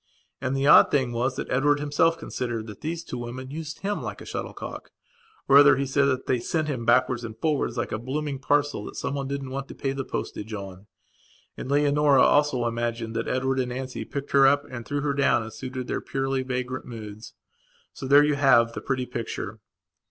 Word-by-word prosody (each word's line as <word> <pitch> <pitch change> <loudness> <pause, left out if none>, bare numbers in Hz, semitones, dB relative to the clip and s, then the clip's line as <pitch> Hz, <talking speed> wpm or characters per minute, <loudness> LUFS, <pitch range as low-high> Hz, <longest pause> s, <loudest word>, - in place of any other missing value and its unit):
And 135 0 -1
the 135 - 0
odd 150 - +8
thing 130 -4 +1
was 125 +2 -1
that - - -5
Edward 145 +3 +3
himself 165 +3 +2
considered 120 -7 -4
that 105 -3 -10
those 165 +2 -4
two 125 - -6
women 130 +2 -7
used 155 +1 -6
him 205 +1 -2
like - - -6
a - - -10
shuttlecock. - - -6 0.6
Or, 140 - +7
rather, 145 -1 +8
he 140 - 0
said 140 +1 +2
that 130 -2 0
they 125 - +1
sent 155 +6 -1
him 130 -6 -3
backwards 120 0 +3
and 110 -1 -7
forwards 150 -1 -1
like 120 - -2
a 110 - -2
blooming 140 +3 -3
parcel 145 -4 +1
that - - -8
someone 140 -1 -3
didn't 140 -1 -4
want 135 +1 -4
to - - -10
pay 135 - -2
the 135 0 -3
postage 110 -3 -5
on. 100 0 -9 0.7
And - - -7
Leonora 145 -1 +4
also 145 -4 +3
imagined 115 -1 -2
that 115 - -2
Edward 130 +1 0
and 125 -1 -1
Nancy 130 +1 -5
picked 140 0 -6
her 135 -1 +6
up 145 +1 +3
and 120 -2 -7
threw 145 0 -2
her 145 -1 0
down 140 -4 +2
as 110 0 -9
suited 130 -1 -5
their - - -3
purely 135 0 -1
vagrant 130 0 -4
moods. 110 -2 -9 0.6
So 130 - -7
there 140 +2 +7
you 150 0 +2
have 130 -5 +4
the - - -5
pretty 130 -2 -2
picture. 115 -3 -5
130 Hz, 210 wpm, -25 LUFS, 120-145 Hz, 0.7 s, odd